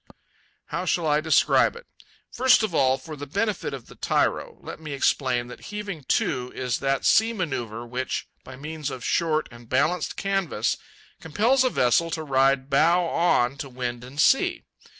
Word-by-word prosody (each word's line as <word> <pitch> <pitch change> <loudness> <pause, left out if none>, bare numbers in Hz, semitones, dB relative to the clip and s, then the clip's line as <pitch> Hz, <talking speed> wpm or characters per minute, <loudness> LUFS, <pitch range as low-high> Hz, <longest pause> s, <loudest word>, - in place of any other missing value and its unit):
How 170 +4 -4
shall 175 -2 0
I 150 0 +2
describe 160 - +3
it? 480 - -12 0.5
First 255 -2 +4
of 210 -5 -2
all, 130 -3 +3
for 155 +4 -9
the 145 0 -8
benefit 205 +6 -1
of 135 -4 -7
the - - -14
tyro, - - -1
let - - -9
me 155 -2 -7
explain 130 -3 +1
that 125 - -11
heaving 200 -8 -6
to 135 - 0
is 125 -2 -2
that 135 -1 -1
sea 225 +2 +4
manœuvre 120 - -4
which, 125 +2 -3 0.2
by 130 - -10
means 150 +2 -5
of 130 -3 -7
short 155 -2 +1
and 120 -1 -14
balanced 155 +6 0
canvas, 195 - -1 0.4
compels 230 - +2
a 255 - +3
vessel 165 - +2
to 160 -1 -3
ride 135 -1 +2
bow 170 +6 +3
on 140 -7 +1
to 135 0 -6
wind 125 -1 -5
and 130 +3 -10
sea. 265 - +3
150 Hz, 170 wpm, -25 LUFS, 130-175 Hz, 0.5 s, First